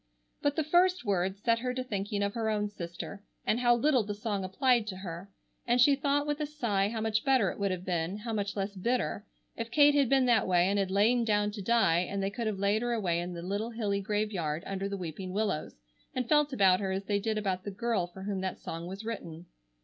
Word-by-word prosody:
But 285 Hz, 0 st, +1 dB
the 315 Hz, -, +1 dB
first 355 Hz, +1 st, +3 dB
words 195 Hz, 0 st, -1 dB
set 230 Hz, 0 st, +3 dB
her 250 Hz, +1 st, -2 dB
to 255 Hz, -, -2 dB
thinking 205 Hz, -3 st, -2 dB
of 200 Hz, 0 st, -1 dB
her 225 Hz, -2 st, -1 dB
own 210 Hz, -1 st, 0 dB
sister, 195 Hz, +1 st, -7 dB, 0.2 s
and 225 Hz, -, +2 dB
how 240 Hz, -1 st, +4 dB
little 260 Hz, +1 st, +3 dB
the 205 Hz, 0 st, -4 dB
song 205 Hz, -2 st, -2 dB
applied 235 Hz, +4 st, +2 dB
to 195 Hz, -, -4 dB
her, 185 Hz, 0 st, -7 dB, 0.4 s
and 240 Hz, +1 st, +3 dB
she 275 Hz, +3 st, +6 dB
thought 285 Hz, +1 st, +1 dB
with 295 Hz, 0 st, -2 dB
a 300 Hz, -, -1 dB
sigh 220 Hz, -10 st, 0 dB
how 220 Hz, 0 st, -3 dB
much 220 Hz, 0 st, 0 dB
better 260 Hz, -8 st, +3 dB
it -, -, -10 dB
would 200 Hz, -1 st, +1 dB
have 185 Hz, -1 st, -4 dB
been, 175 Hz, +1 st, -1 dB
how 225 Hz, +2 st, -5 dB
much 205 Hz, -1 st, -2 dB
less 200 Hz, 0 st, -2 dB
bitter, 230 Hz, +1 st, -1 dB, 0.3 s
if 230 Hz, 0 st, -4 dB
Kate 290 Hz, +3 st, +6 dB
had 280 Hz, -4 st, +3 dB
been 270 Hz, -1 st, +4 dB
that 235 Hz, -5 st, +3 dB
way 180 Hz, -1 st, +4 dB
and 200 Hz, +1 st, +1 dB
had 195 Hz, -1 st, 0 dB
lain 220 Hz, +5 st, +3 dB
down 210 Hz, -2 st, +1 dB
to 205 Hz, -1 st, -6 dB
die 195 Hz, -5 st, +3 dB
and 195 Hz, +2 st, -2 dB
they 195 Hz, -, -1 dB
could 230 Hz, +1 st, -3 dB
have 210 Hz, -2 st, -1 dB
laid 200 Hz, +2 st, +1 dB
her 240 Hz, 0 st, 0 dB
away 180 Hz, -7 st, 0 dB
in 175 Hz, +1 st, -4 dB
the 170 Hz, -1 st, -6 dB
little 200 Hz, +5 st, -2 dB
hilly 210 Hz, -4 st, -1 dB
graveyard 190 Hz, -7 st, -2 dB
under 195 Hz, 0 st, -3 dB
the 200 Hz, -, -3 dB
weeping 185 Hz, +1 st, -6 dB
willows, 205 Hz, -7 st, -1 dB, 0.4 s
and 250 Hz, -2 st, -1 dB
felt 295 Hz, 0 st, +3 dB
about 190 Hz, -7 st, +4 dB
her 195 Hz, -2 st, -2 dB
as 190 Hz, +1 st, -2 dB
they 205 Hz, 0 st, +1 dB
did 220 Hz, +1 st, -1 dB
about 190 Hz, -3 st, -1 dB
the 205 Hz, -, -4 dB
girl 205 Hz, -2 st, -1 dB
for 190 Hz, +2 st, -11 dB
whom 195 Hz, -1 st, -2 dB
that 190 Hz, -1 st, -3 dB
song 165 Hz, +1 st, -6 dB
was 195 Hz, +4 st, -7 dB
written. 170 Hz, -7 st, -6 dB
205 Hz, 245 wpm, -30 LUFS, 190-235 Hz, 0.4 s, she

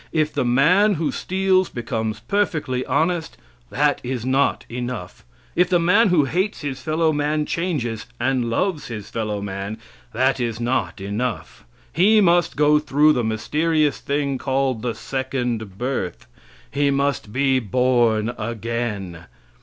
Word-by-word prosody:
If 155 Hz, -1 st, 0 dB
the 140 Hz, -, 0 dB
man 175 Hz, -, +4 dB
who 160 Hz, -1 st, -1 dB
steals 190 Hz, 0 st, +1 dB
becomes 110 Hz, -2 st, -3 dB
perfectly 155 Hz, -11 st, -1 dB
honest, 165 Hz, 0 st, 0 dB, 0.3 s
that 145 Hz, +1 st, +1 dB
is 125 Hz, -2 st, -3 dB
not 135 Hz, +2 st, +1 dB
enough; 120 Hz, -6 st, -6 dB, 0.3 s
if 180 Hz, +1 st, +3 dB
the 180 Hz, -, +4 dB
man 180 Hz, +7 st, +4 dB
who 165 Hz, -5 st, +4 dB
hates 185 Hz, +9 st, -1 dB
his 140 Hz, -3 st, -4 dB
fellow 160 Hz, 0 st, +1 dB
man 150 Hz, +1 st, 0 dB
changes 140 Hz, -12 st, -2 dB
and 125 Hz, -1 st, 0 dB
loves 155 Hz, +7 st, -1 dB
his 105 Hz, -4 st, -7 dB
fellowman, 100 Hz, -2 st, -3 dB, 0.3 s
that 130 Hz, +3 st, +1 dB
is 115 Hz, -2 st, -2 dB
not 120 Hz, -7 st, -1 dB
enough; 105 Hz, -, -4 dB, 0.3 s
he 205 Hz, +7 st, +5 dB
must 175 Hz, -3 st, +3 dB
go 150 Hz, 0 st, +5 dB
through 150 Hz, +1 st, +3 dB
the 125 Hz, -, 0 dB
mysterious 150 Hz, +7 st, 0 dB
thing 140 Hz, -2 st, -1 dB
called 130 Hz, -3 st, 0 dB
the 120 Hz, -1 st, -2 dB
second 125 Hz, -7 st, -3 dB
birth; 125 Hz, -7 st, -3 dB, 0.5 s
he 140 Hz, 0 st, +1 dB
must 140 Hz, -5 st, 0 dB
be 135 Hz, +2 st, +2 dB
born 120 Hz, -1 st, +2 dB
again. 110 Hz, -6 st, -4 dB
130 Hz, 140 wpm, -22 LUFS, 115-155 Hz, 0.5 s, he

